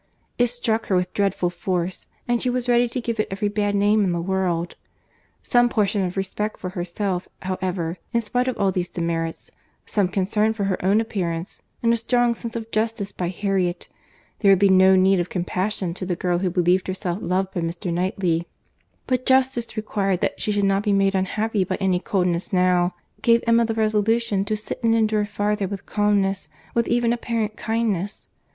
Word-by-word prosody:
It 245 - +5
struck 230 -2 -1
her 190 - +1
with 180 0 0
dreadful 195 -3 0
force, 180 0 -3 0.2
and 240 -1 +1
she 255 - +1
was 250 0 -1
ready 240 0 +3
to 250 - -3
give 230 -2 -3
it 215 - +1
every 205 +2 -1
bad 205 0 0
name 205 +1 +3
in 185 -3 +1
the 170 - -1
world. 175 -1 -1 0.7
Some 240 -1 +3
portion 205 -3 +1
of 180 +1 -3
respect 210 +3 -2
for 185 - -5
herself, 180 +1 -3 0.2
however, 185 -2 -3
in 235 -1 +1
spite 245 +3 -1
of 255 - -1
all 195 -1 +2
these 180 -1 -2
demerits—some 170 +3 -3
concern 210 +4 +1
for 215 -2 -3
her 195 -2 -1
own 200 +4 +4
appearance, 180 -6 -4 0.2
and 230 0 +4
a - - +2
strong 240 +1 +2
sense 230 0 -5
of 225 -1 -5
justice 215 -2 -1
by 180 - -3
Harriet—(there 190 +1 -2
would 195 - +6
be 200 +1 +4
no 190 0 +6
need 190 0 +4
of 175 - -2
compassion 185 0 -2
to 185 - -5
the 180 - 0
girl 175 0 0
who 185 0 0
believed 180 +1 +2
herself 185 -1 -3
loved 190 +1 -1
by 175 - -2
Mr. 170 +1 -3
Knightley—but 185 +7 -3
justice 260 -4 +2
required 195 -3 -1
that - - -1
she 210 - +1
should 205 -1 +1
not 195 0 +2
be 205 -1 +1
made 195 0 +3
unhappy 205 +2 0
by 185 - -2
any 190 -2 +1
coldness 180 -1 -1
now,) 180 -1 +2 0.3
gave 235 0 +4
Emma 230 0 +4
the 225 0 -2
resolution 215 -1 +1
to 215 +1 -1
sit 210 +4 -6
and 225 0 +4
endure 215 -2 +2
farther 205 0 -1
with 200 0 -6
calmness, 200 -4 +1 0.2
with 235 -1 +1
even 240 -1 +2
apparent 230 -3 -2
kindness. 215 -3 -2
200 Hz, 185 wpm, -23 LUFS, 185-220 Hz, 0.7 s, would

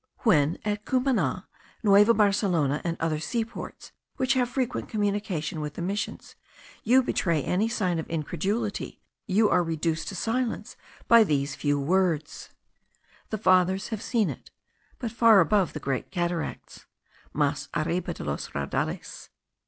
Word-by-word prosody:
When, 155 - +3
at 210 0 -2
Cumana, 225 - 0 0.4
Nueva 210 +2 +6
Barcelona, 190 -9 +2
and 170 -1 -2
other 160 -2 -1
seaports 225 +7 -5 0.3
which 260 0 +2
have 250 -2 +1
frequent 255 0 -2
communication 200 -6 -2
with 150 -1 -5
the 170 - -4
Missions, 200 +4 -4 0.5
you 255 +4 +5
betray 165 - 0
any 200 +5 +1
sign 185 -7 -1
of 160 - -6
incredulity, 170 +7 -3 0.3
you 210 +2 +3
are - - +4
reduced 165 -1 -2
to 195 - -5
silence 230 +5 -2 0.3
by 230 -1 +8
these 140 -6 0
few 145 0 0
words: 165 0 0 0.8
The 215 - -2
fathers 185 -1 +3
have 220 -3 -4
seen 230 -4 +1
it, - - -11 0.5
but 235 -4 -4
far 230 -2 +6
above 190 +2 +2
the 150 - -5
Great 135 -3 -3
Cataracts 175 -2 -4 0.4
(mas 145 0 -1
arriba 170 +2 -1
de - - -7
los 70 -1 -3
Raudales). 70 -1 -3
185 Hz, 140 wpm, -26 LUFS, 160-220 Hz, 0.8 s, by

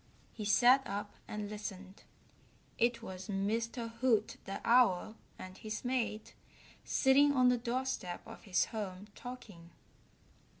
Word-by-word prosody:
He 215 - -6
sat 245 +6 +6
up 205 +1 -4
and 210 -1 -4
listened. 200 -2 -8 0.7
It 235 -1 +2
was 185 -3 -7
Mr. 230 +4 -2
Hoot 230 -4 +2
the 195 +1 -4
Owl 225 -3 +4 0.2
and 185 0 -9
his 215 +2 -5
mate 235 -4 -2 0.5
sitting 285 +2 +4
on 255 -2 +5
the 250 - +3
doorstep 240 -7 -3
of 225 - -11
his 190 -3 +2
home 205 -2 -5
talking. 215 -9 -10
215 Hz, 125 wpm, -34 LUFS, 200-245 Hz, 0.7 s, sat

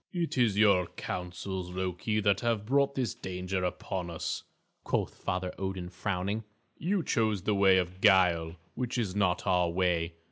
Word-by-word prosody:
"It 170 -2 -2
is 115 -6 +2
your 100 -4 +5
counsels, 90 +1 -5
Loki, 95 +4 -1
that 100 -1 +3
have 115 -3 0
brought 140 +3 +2
this 125 -6 -1
danger 90 0 -3
upon 90 0 -3
us," 85 - -3 0.4
quoth - - -1
Father 90 0 -3
Odin, 95 -2 -3
frowning. 100 +3 -2 0.3
"You 185 +1 0
chose 110 -8 +1
the 105 - +1
way 100 -1 +5
of 90 0 -2
guile, 85 -3 +4 0.2
which 125 0 -3
is 105 -6 -1
not 95 -4 +1
our 90 -3 +3
way. 85 -1 0
95 Hz, 155 wpm, -30 LUFS, 90-105 Hz, 0.4 s, your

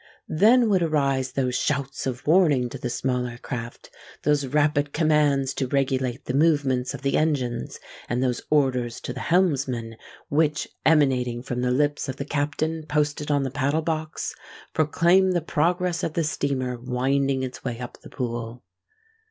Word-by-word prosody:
Then 230 +8 +5
would 190 -3 +3
arise 140 -5 +1
those 130 -2 0
shouts 140 0 -1
of 130 -1 -4
warning 150 -7 +4
to - - -8
the 125 - -3
smaller 125 -1 -2
craft,—those 135 +4 -4
rapid 145 +1 +1
commands 150 -4 +2
to 130 - -2
regulate 130 -1 -1
the 125 - -3
movements 140 -4 +2
of - - -10
the 140 - +1
engines,—and 125 -3 -2
those 125 -2 0
orders 125 -5 +1
to - - -5
the - - -7
helmsman, 135 -10 0 0.3
which, 150 0 +1 0.2
emanating 125 -6 +2
from 125 -1 -3
the 125 - +1
lips 145 +2 0
of 130 - -3
the 140 - -5
captain 150 +2 -2
posted 150 0 0
on 145 -1 +2
the 135 - -3
paddle 145 +3 0
box, 155 -1 -3 0.4
proclaim 175 +4 +3
the 175 - +2
progress 170 +2 0
of 160 - -2
the 165 - 0
steamer 130 -5 -2
winding 130 +2 0
its 130 -1 -6
way 120 -3 -4
up 125 -1 -8
the - - -12
pool. 120 -1 -5
140 Hz, 155 wpm, -24 LUFS, 125-155 Hz, 0.4 s, Then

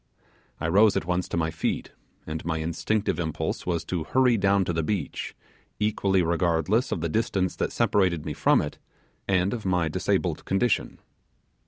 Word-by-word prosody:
I - - -1
rose 100 +5 +5
at - - -2
once 90 +1 -1
to - - -2
my 80 -1 0
feet, - - -2 0.3
and 80 0 -5
my 80 -1 -1
instinctive 95 +5 -1
impulse 80 +1 -3
was 85 -2 -1
to 85 -2 -2
hurry 130 -2 +3
down 100 -1 +2
to 85 - -1
the 80 - 0
beach, 90 0 -3 0.4
equally 100 -3 +2
regardless 85 - +1
of 85 - -1
the 85 - 0
distance 95 -2 0
that - - -1
separated 90 -6 +1
me 75 - -3
from - - +3
it, - - -6 0.5
and 95 +1 +2
of 115 -3 -4
my 90 -4 +1
disabled - - -1
condition. 105 +4 0
90 Hz, 170 wpm, -26 LUFS, 80-100 Hz, 0.5 s, rose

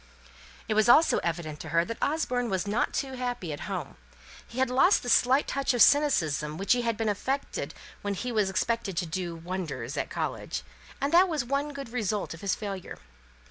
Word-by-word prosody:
It - - 0
was 215 +2 +3
also 315 +7 +6
evident 160 -3 -3
to - - -7
her 170 0 +2
that 230 - -6
Osborne 250 -5 0
was 190 -2 -1
not 210 +4 0
too 270 - -2
happy 245 -10 -3
at 145 - -7
home. - - -5 0.5
He 230 - -11
had 260 -1 +1
lost 350 +10 +4
the 245 - -3
slight 255 +4 +4
touch 275 -2 0
of 240 - +1
cynicism 160 - +3
which 195 +5 +3
he 245 - +1
had 230 -2 -1
affected 225 +6 -2 0.3
when 205 -1 -2
he 245 +6 -3
was 210 -4 +1
expected 195 -1 -1
to 180 - +1
do 170 +1 -4
wonders 160 -7 -5
at - - -2
college; - - -3 0.4
and 280 +3 -1
that 360 +3 +7
was 305 -7 -1
one 280 +3 -1
good 280 -3 -7
result 215 -5 -2
of 165 - -11
his 195 -2 0
failure. 195 -3 -6
220 Hz, 195 wpm, -28 LUFS, 180-260 Hz, 0.5 s, that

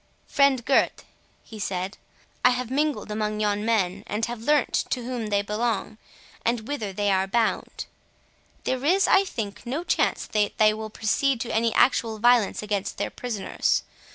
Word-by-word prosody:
"Friend 275 -4 +2
Gurth," 275 - +2 0.4
he 220 - -11
said, 190 -1 -3 0.4
"I - - +7
have 250 -1 -2
mingled 290 -5 -1
among 210 0 -2
yon 210 -1 0
men, 200 -4 0
and 215 +2 -1
have 235 -1 -6
learnt 295 +2 +2 0.2
to 250 - -2
whom 240 -2 -4
they 205 -1 +1
belong, 215 0 -2 0.4
and 235 -1 -1
whither 230 -9 -3
they 205 +1 0
are 190 0 +2
bound. 225 +3 -1 0.8
There 260 0 -1
is, 370 +7 +3
I 390 - +5
think, 220 - -5
no 270 +7 -3
chance - - +1
that 210 -1 -1
they 215 -1 +5
will 220 0 -6
proceed 230 +5 0
to 240 - -3
any 230 +1 +2
actual 230 -3 +3
violence 240 -2 +3
against 205 -2 -2
their - - -2
prisoners. 225 -6 -1
225 Hz, 165 wpm, -25 LUFS, 210-250 Hz, 0.8 s, I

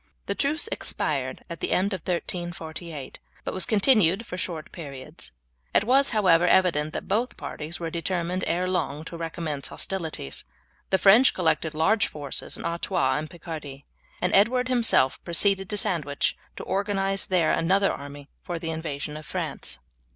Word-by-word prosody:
The - - -1
truce 300 +8 0
expired - - -1
at - - -7
the 365 - -2
end 195 +2 +2
of 185 - -3
1348, 170 -4 -4 0.2
but - - -3
was 185 - +1
continued 215 -3 +4
for 180 - -6
short 170 -3 -4
periods. 140 -6 -9 0.4
It - - +6
was, 270 +4 +4
however, 180 -6 +4
evident 170 -5 +3
that - - -5
both 235 +5 0
parties 155 +3 -5
were 165 -1 -3
determined 175 +1 -1
ere 180 +2 +1
long 180 -4 -1
to 165 - -8
recommence 165 -3 -3
hostilities. 160 - -3 0.5
The 190 - +4
French 210 +7 +6
collected 160 -2 +1
large 190 +6 +3
forces 145 -3 -3
in - - -7
Artois 170 -5 +1
and 155 0 -6
Picardy, 155 -5 -8 0.3
and 180 +3 0
Edward 250 +5 +4
himself 230 - +3
proceeded 195 +2 +1
to 210 - -1
Sandwich 150 -7 0 0.2
to - - -6
organize 195 0 0
there 175 -4 +3
another 195 +4 +3
army 145 0 -8
for 175 - -4
the 165 0 -3
invasion 150 -2 -4
of 155 - -10
France. - - -4
175 Hz, 160 wpm, -26 LUFS, 155-195 Hz, 0.5 s, It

